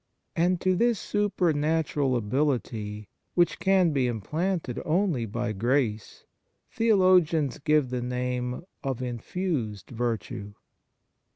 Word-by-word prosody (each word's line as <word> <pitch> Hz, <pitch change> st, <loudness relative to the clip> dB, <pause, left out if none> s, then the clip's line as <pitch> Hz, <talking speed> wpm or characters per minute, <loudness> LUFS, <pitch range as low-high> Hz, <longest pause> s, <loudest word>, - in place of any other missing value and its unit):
And 175 Hz, +1 st, +2 dB
to 185 Hz, 0 st, +2 dB
this 235 Hz, +1 st, +2 dB
supernatural 160 Hz, -8 st, +1 dB
ability, 115 Hz, -4 st, -1 dB, 0.3 s
which 175 Hz, -1 st, +2 dB
can 190 Hz, -3 st, +3 dB
be 135 Hz, -4 st, +1 dB
implanted 150 Hz, -, -2 dB
only 160 Hz, -, +1 dB
by 120 Hz, +2 st, -2 dB
grace, 110 Hz, 0 st, -1 dB, 0.5 s
theo 225 Hz, -1 st, +3 dB
logians 170 Hz, -7 st, +3 dB
give 150 Hz, -4 st, +2 dB
the 125 Hz, -1 st, -1 dB
name 125 Hz, +1 st, -2 dB, 0.2 s
of 130 Hz, -3 st, -3 dB
infused 125 Hz, -, -3 dB
virtue. 110 Hz, -3 st, -3 dB
140 Hz, 105 wpm, -27 LUFS, 120-175 Hz, 0.5 s, can